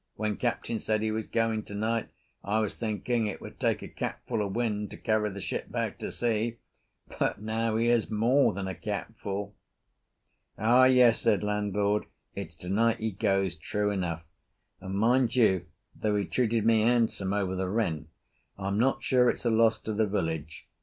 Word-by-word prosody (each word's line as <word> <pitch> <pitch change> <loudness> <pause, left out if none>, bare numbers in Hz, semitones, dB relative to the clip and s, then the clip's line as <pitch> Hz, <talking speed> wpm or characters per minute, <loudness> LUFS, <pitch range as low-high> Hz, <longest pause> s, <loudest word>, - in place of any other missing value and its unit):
"When 105 -1 -2
Captain 120 -2 -1
said 110 0 0
he 110 - 0
was 110 0 -3
going 115 -1 0
tonight, 110 +2 -2 0.3
I 105 +2 0
was 110 -2 0
thinking 110 +1 -1
it 105 - -4
would - - -11
take - - 0
a - - -6
capful 105 - -3
of 100 -1 -4
wind 105 -3 -1
to - - -9
carry 110 -1 +1
the 100 0 -7
ship - - -4
back - - -2
to - - -4
sea, 115 0 -1 0.6
but - - +1
now 110 +1 -1
here's 115 0 +2
more 115 +6 +3
than 95 +1 -4
a 95 - -3
capful." 100 0 -5 1.0
"Ah, 120 +4 +5
yes," 125 -3 +5
said 110 -5 +2
landlord, 105 0 0 0.3
"it's - - -7
tonight 110 +6 +1
he 110 0 -2
goes 95 -3 0
true 105 +5 -1
enough, 85 -4 -2 0.6
and, 95 +1 -5
mind 120 +4 +3
you, 95 -8 +3 0.3
though 105 -1 0
he 100 -1 0
treated 115 -3 0
me 115 -1 +5
handsome 115 -4 +2
over 100 -2 0
the 95 0 -2
rent, 85 -8 -1 0.5
I'm 100 +1 -1
not 130 +3 +2
sure 125 -1 +4
it's - - -3
a 120 - +3
loss 110 0 +4
to 110 - -3
the 110 0 +1
village. 80 -5 -3
110 Hz, 175 wpm, -28 LUFS, 100-115 Hz, 1.0 s, Ah